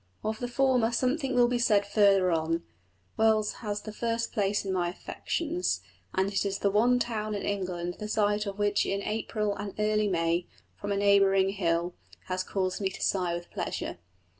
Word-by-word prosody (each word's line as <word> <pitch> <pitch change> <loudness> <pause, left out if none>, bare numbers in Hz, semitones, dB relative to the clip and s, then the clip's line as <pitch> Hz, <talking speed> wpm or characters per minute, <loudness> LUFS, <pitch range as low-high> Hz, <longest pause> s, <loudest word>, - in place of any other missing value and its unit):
Of 220 0 -2
the 245 - -2
former 245 -2 +2
something 260 +2 0
will 245 -1 +5
be 245 0 0
said 210 -4 +3
further 200 -3 +4
on: 165 +1 0 0.5
Wells 220 -1 +3
has 210 -2 -3
the 215 - -7
first 230 +1 -2
place 205 -1 0
in 190 - -1
my 175 -2 0
affections, 335 - -2 0.3
and 190 +2 +1
is 195 0 0
the 200 - +1
one 240 +5 +4
town 215 -3 -2
in 200 - -4
England 180 -3 -3
the 210 - -4
sight 210 0 +1
of 200 0 -5
which 205 -1 +2
in 200 +1 -2
April 210 -1 -1
and 205 -1 -6
early 215 0 +2
May, 170 -1 0 0.3
from 205 - -5
a 200 - +1
neighbouring 195 -1 +4
hill, 175 -3 0 0.3
has 185 0 -2
caused 185 0 -2
me 195 - +1
to - - -9
sigh 180 -3 +1
with 175 0 -8
pleasure. - - -4
205 Hz, 185 wpm, -28 LUFS, 190-220 Hz, 0.5 s, will